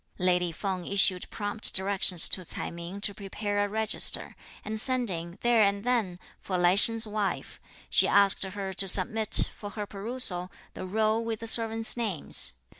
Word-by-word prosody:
Lady 180 -2 0
Feng 185 +1 -5
issued 195 -2 +2
prompt 205 +1 +2
directions 190 -3 +3
to 185 - 0
Ts'ai - - -7
Ming 170 +4 -9
to 205 - -3
prepare 205 +1 -4
a 205 - -3
register; 220 +1 +1 0.3
and 215 +1 -2
sending, 190 -10 -2
there 240 -2 +2
and 200 0 0
then, 225 -8 -2 0.2
for 185 - -4
Lai 175 0 +3
Sheng's 225 +2 +3
wife, 210 -2 -5 0.3
she - - +4
asked 200 -1 +4
her 190 0 -6
to 195 +1 -1
submit, 215 +4 +3
for 205 - -9
her 210 0 -7
perusal, 200 -3 -2 0.2
the 185 - -8
roll 220 +3 -1
with 225 -1 -5
the - - -6
servants' 225 0 +2
names. 190 - 0
200 Hz, 165 wpm, -27 LUFS, 185-220 Hz, 0.3 s, she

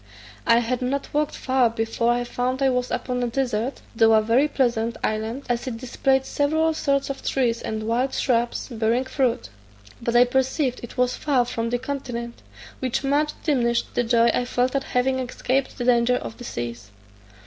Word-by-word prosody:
I 230 +1 +5
had 240 +2 -2
not 270 +3 -2
walked 300 0 0
far 255 -2 +2
before 225 +1 0
I 245 0 +1
found 250 +2 -2
I 265 - +4
was 250 0 -1
upon 250 -1 -2
a 245 - 0
desert, 245 0 -2
though 225 0 +5
a 220 - +6
very 240 +7 +3
pleasant, 235 -5 0
island, 220 +5 -2
as 245 +1 -1
it 235 -3 -3
displayed 265 +2 +1
several 315 +3 +1
sorts 275 -2 0
of 270 - -7
trees 240 -4 0
and 220 0 -4
wild 240 +4 0
shrubs 240 -2 0
bearing 230 +2 0
fruit; 260 - -1 0.5
but 235 0 -1
I 240 - +8
perceived 265 +1 0
it 240 - -10
was 250 0 +2
far 265 -5 +1
from 230 -1 -3
the 245 - 0
continent, 245 -3 -5 0.4
which 260 +1 -1
much 290 +2 +1
diminished 240 -6 +1
the 245 - +1
joy 235 0 +4
I 245 - 0
felt 250 +2 0
at 275 - 0
having 260 +1 +1
escaped 255 +1 -1
the 245 - -3
danger 245 0 +4
of - - -6
the 245 - -8
seas. 120 - -5
250 Hz, 185 wpm, -24 LUFS, 235-265 Hz, 0.5 s, I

